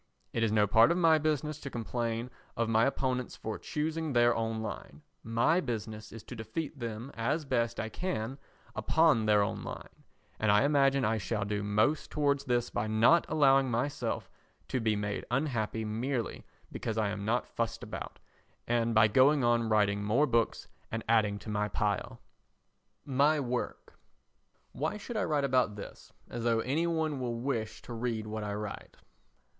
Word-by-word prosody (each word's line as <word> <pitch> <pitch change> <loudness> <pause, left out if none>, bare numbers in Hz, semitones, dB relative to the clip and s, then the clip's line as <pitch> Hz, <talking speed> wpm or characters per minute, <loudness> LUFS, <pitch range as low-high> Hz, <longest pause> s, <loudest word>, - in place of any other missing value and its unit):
It 115 - -1
is 115 -2 +2
no 105 -1 +4
part 115 +5 +6
of 170 - +1
my 165 -3 +5
business 155 0 -1
to 140 - -6
complain 120 0 -3 0.3
of 115 -1 +1
my 115 +1 +3
opponents 130 -2 -1
for 110 -1 -5
choosing 155 0 -2
their 120 0 +4
own 115 -1 -2
line; 75 -8 -7 0.2
my 115 +10 +2
business 110 - -5
is 115 - -9
to 125 - -9
defeat 145 +6 -5
them 115 +2 -5
as 140 +7 -1
best 120 -3 0
I 110 - -2
can 135 -6 -3 0.4
upon 155 -9 +3
their 105 -1 +5
own 105 0 -3
line, - - -9 0.4
and 110 -1 +3
I 105 +3 +5
imagine 140 -2 +3
I 110 +1 +1
shall 105 +1 -2
do 105 0 -2
most 105 +9 +1
towards 140 -2 +1
this 120 -2 0
by 110 - -1
not 115 +10 +4
allowing 135 -3 +4
myself 125 +5 -2 0.4
to 130 - 0
be 110 -2 +1
made 100 0 -3
unhappy 120 -5 -1
merely 115 +3 -3 0.2
because 110 -1 -4
I 105 -2 +1
am 100 0 -4
not 115 +4 +1
fussed 115 -2 -3
about, - - -7 0.5
and 115 -1 +1
by 110 - +7
going 135 +5 +4
on 120 -1 +2
writing 100 -1 +2
more 115 +8 +3
books 115 -4 0 0.2
and 115 0 -3
adding 110 -3 +3
to 105 - -9
my 105 0 0
pile. 90 -7 -2 0.9
My 145 +3 +3
Work 125 -2 -4 0.7
Why 155 +9 -2
should 230 +3 -7
I 210 - +1
write 150 -2 +1
about 125 -5 +2
this 100 - -10 0.2
as 120 -1 -5
though 115 -1 +2
any 155 +8 0
one 160 -4 -1
will 120 -2 -3
wish 115 -4 -3
to 120 - -8
read 115 -2 -2
what 110 0 -4
I 105 -1 -3
write? 105 0 -7
115 Hz, 175 wpm, -31 LUFS, 110-140 Hz, 0.9 s, by